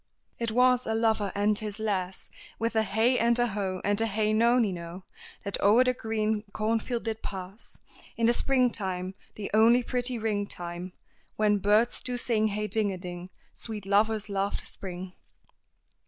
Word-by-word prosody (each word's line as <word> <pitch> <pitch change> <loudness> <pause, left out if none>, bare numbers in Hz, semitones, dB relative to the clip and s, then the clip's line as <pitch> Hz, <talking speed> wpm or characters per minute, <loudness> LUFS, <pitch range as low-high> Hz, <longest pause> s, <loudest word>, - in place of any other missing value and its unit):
"It 230 -1 -1
was 250 +2 +3
a 220 - 0
lover 220 -3 +1
and 205 +1 +3
his 210 -1 -4
lass 190 -4 -3 0.3
With 230 0 -2
a 220 - +4
hey 220 +5 +2
and 235 0 +3
a 240 - +3
ho, 195 -4 -3
and 205 +1 +1
a 225 - +2
hey 215 0 0
nonino! 200 -7 +1 0.4
That 200 -1 -3
o'er 215 +5 +6
the 255 0 +2
green 220 -2 -1
cornfield 230 +2 -1
did 225 -1 -3
pass 190 +2 -7 0.4
In 230 - +2
the 235 - +5
Spring 255 0 +3
time, 185 -3 -1 0.2
the 210 - -6
only 230 +3 +5
pretty 245 0 -1
ring 210 -2 -1
time, 175 0 -6 0.4
When 210 -1 +2
birds 210 +4 +2
do 250 -1 -2
sing 225 -3 +1
hey 210 0 -2
ding 210 -1 +1
a 190 - -5
ding, 180 0 -7 0.2
Sweet 215 -3 -7
lovers 210 +2 +2
love 200 0 -1
the - - -10
Spring." 185 -1 -8
215 Hz, 170 wpm, -28 LUFS, 195-230 Hz, 0.4 s, o'er